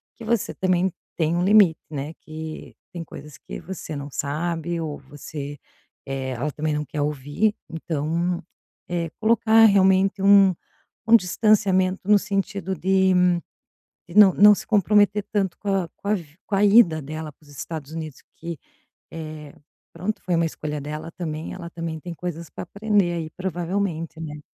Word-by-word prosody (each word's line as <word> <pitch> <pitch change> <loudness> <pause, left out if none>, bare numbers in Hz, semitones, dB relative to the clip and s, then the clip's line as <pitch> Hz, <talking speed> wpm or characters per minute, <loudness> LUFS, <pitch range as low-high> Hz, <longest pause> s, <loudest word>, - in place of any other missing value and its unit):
que 230 - -10
você 230 -2 0
também 185 0 +1 0.3
tem 165 0 +1
um 175 - +1
limite, 195 -4 +5
né. 145 0 -5
Que 155 0 -8 0.2
tem 170 -2 -5
coisas 150 -2 -11
que - - -8
você 170 -3 -7
não 140 0 -6
sabe 165 +4 -2
ou 150 -2 -4
você, 145 +1 -8 0.5
eh, 135 -1 -3
ela 135 +5 -2
também 155 +1 -2
não 150 0 -2
quer 145 +2 -4
ouvir. 145 +9 0
Então, 165 +2 -2 0.5
é, 170 -2 -2
colocar 225 0 +5
realmente 195 -1 +4
um 195 -2 +6 0.5
um 230 - +9
distanciamento 190 -2 +2
no 210 - +7
sentido 195 -2 -2
de 190 +2 +3 1.0
de 170 - -11
não 205 -3 +8
não 210 +1 +8
se - - -8
comprometer 205 -1 +3
tanto 195 -4 0
com 205 - -6
a 195 -3 +1
com 200 - -7
a 210 - +3
vi 160 -6 -7
com 210 - -3
a 205 - +3
ida 200 -6 +6
dela 155 +2 -6
para 150 - -27
os - - -17
Estados 150 +1 -7
Unidos, 155 -4 -6
que, 165 -2 -7 0.5
é, 155 -2 -8 0.4
pronto, 190 +6 -3
foi 180 -2 0
uma 165 0 +2
escolha 150 -2 -4
dela 150 +3 -6
também, 160 -3 -5
ela 170 -2 -7
também 165 -2 -5
tem 175 +2 -7
coisas 170 -1 -6
para - - -7
aprender 200 -1 +1
aí, 165 -2 -4
provavelmente, 175 -2 -3
né. 150 -2 -7
170 Hz, 165 wpm, -23 LUFS, 155-195 Hz, 1.0 s, um